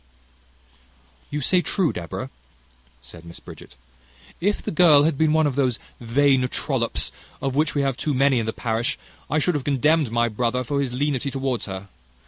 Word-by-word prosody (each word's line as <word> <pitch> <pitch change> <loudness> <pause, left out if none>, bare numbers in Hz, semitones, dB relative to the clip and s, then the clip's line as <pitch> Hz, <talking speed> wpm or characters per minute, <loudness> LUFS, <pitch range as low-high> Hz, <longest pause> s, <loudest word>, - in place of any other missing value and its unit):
"You 150 +1 -3
say 180 +7 +3
true, 180 -3 0
Deborah," 85 -3 -6 0.7
said 85 -1 -12
Miss 85 0 -11
Bridget. - - -13 0.6
"If 205 +4 0
the - - -3
girl 155 -4 +6
had 160 0 +2
been 155 +2 +2
one 160 0 +3
of 145 - 0
those 130 -4 +1 0.2
vain 130 +2 +2
trollops, - - -1 0.3
of 135 -1 -2
which 150 +1 +1
we 140 - +1
have 135 -2 -1
too 145 +3 -1
many 135 -1 +3
in 110 - -3
the - - 0
parish, 115 +4 -2 0.3
I 150 - +1
should 175 +4 +1
have 145 -3 -2
condemned 145 +1 +2
my 120 0 +2
brother 120 +3 -1
for 140 +3 -1
his 135 -3 -2
lenity 140 +1 -1
towards 135 -3 -2
her. 95 0 -7
135 Hz, 180 wpm, -23 LUFS, 120-150 Hz, 0.7 s, girl